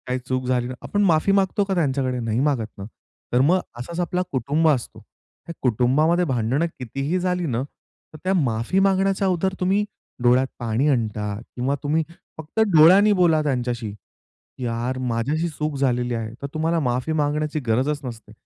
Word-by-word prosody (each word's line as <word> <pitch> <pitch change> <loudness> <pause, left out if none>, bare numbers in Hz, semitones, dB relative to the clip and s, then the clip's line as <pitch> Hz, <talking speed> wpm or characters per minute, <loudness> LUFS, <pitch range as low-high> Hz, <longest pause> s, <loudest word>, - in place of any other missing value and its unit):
काही 125 0 -1
चूक 130 0 -1
झाली 125 -1 0
ना, 130 - -5
आपण 205 0 0
माफी 165 +2 +3
मागतो 195 +1 +2
का 195 -1 -2
त्यांच्याकडे 135 -6 0
नाही 115 0 -1
मागत 135 -6 +1
ना. 100 - -7 0.5
तर 125 - +4
मग 175 +7 +4 0.2
असाच 170 +8 -6
आपला 180 +1 0
कुटुंब 140 +5 +1
असतो. 130 -6 -1 0.5
त्या 170 - -6
कुटुंबामध्ये 140 +9 +2
भांडणं 130 +2 0
कितीही 135 +8 -2
झाली 180 -1 -1
ना, 125 -5 -1 0.5
तर - - -9
त्या 185 +1 +1
माफी 125 0 +1
मागण्याच्या 195 0 +2
अगोदर 185 +1 0
तुम्ही 195 +3 +2 0.4
डोळ्यात 125 +2 +4
पाणी 120 +4 0
आणता 105 -5 -1
किंवा 125 +3 -3
तुम्ही 155 +2 +1 0.3
फक्त 160 +6 -6 0.2
डोळ्यांनी 185 +7 +7
बोला 170 -5 +3
त्यांच्याशी, 120 -6 -2 0.7
"यार, 120 +2 -2
माझी 120 +1 -1
अशी 160 +2 0
चूक 150 -1 -3
झालेली 125 -2 0
आहे," 115 -1 -4
तर - - -2
तुम्हाला 165 +2 +1
माफी 125 +2 -1
मागण्याची 150 0 0
गरजच 130 +6 +1
नसते. 115 -4 -8
140 Hz, 165 wpm, -23 LUFS, 125-170 Hz, 0.7 s, डोळ्यांनी